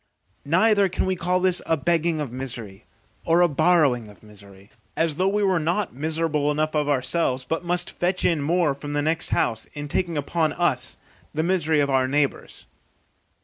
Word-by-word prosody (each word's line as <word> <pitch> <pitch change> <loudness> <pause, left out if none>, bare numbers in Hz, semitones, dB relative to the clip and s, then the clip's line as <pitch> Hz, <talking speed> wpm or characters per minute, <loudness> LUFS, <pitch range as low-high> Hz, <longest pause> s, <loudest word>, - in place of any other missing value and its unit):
Neither 200 +4 +3
can - - -1
we 190 0 0
call 180 +1 0
this 185 -1 +2
a 165 - +2
begging 165 +2 0
of 145 -5 -4
misery, 120 -6 -7 0.4
or 165 +2 +3
a 175 - +6
borrowing 150 -7 +2
of 105 +1 -17
misery, 100 -1 -16 0.3
as 160 -2 0
though 185 - +2
we 205 +1 +1
were 190 -3 +2
not 170 +5 -1
miserable 155 +1 -1
enough 155 +1 0
of 150 -1 0
ourselves, 130 -1 0
but 165 +1 -3
must 175 0 -1
fetch 180 +1 -1
in 165 -4 +2
more 160 0 +1
from 145 +1 -7
the 145 0 0
next 160 +2 0
house, 110 -1 0
in 145 0 -6
taking 170 +2 -1
upon 155 +1 0
us 130 -8 0 0.4
the 155 - 0
misery 165 -3 +1
of 140 -1 0
our 130 -1 +2
neighbours. 140 +1 -2
155 Hz, 185 wpm, -23 LUFS, 140-175 Hz, 0.4 s, a